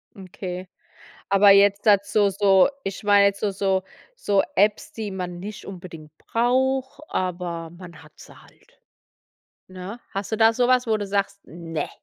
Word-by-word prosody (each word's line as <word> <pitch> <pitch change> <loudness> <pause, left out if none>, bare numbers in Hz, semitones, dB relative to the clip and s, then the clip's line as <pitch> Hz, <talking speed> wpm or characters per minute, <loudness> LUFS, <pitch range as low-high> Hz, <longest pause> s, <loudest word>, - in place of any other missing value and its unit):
Okay, 185 -1 -7 0.6
aber 200 0 +6
jetzt 200 0 +4
dazu 205 0 +3
so 195 -1 +4 0.2
ich 195 +1 -6
meine 205 -1 +5
jetzt 200 0 +1
so 205 -2 -1
so 190 -1 0 0.3
so 200 - +1
Apps, 205 +2 +1
die 215 -3 -6
man 180 -2 -5
nicht 205 +2 -8
unbedingt 170 -5 -10
braucht, 260 +4 -1
aber 175 -2 -3
man 175 -1 -13
hat 150 - -18
sie - - -15
halt, - - -25 0.9
ne? 185 +5 -9
Hast 195 +2 -4
du - - +1
da 225 0 +5
sowas, 250 +1 +2
wo 220 - +2
du 205 -1 -5
sagst: 200 0 -2
„Ne.“ 165 -2 -6
195 Hz, 155 wpm, -23 LUFS, 180-210 Hz, 0.9 s, aber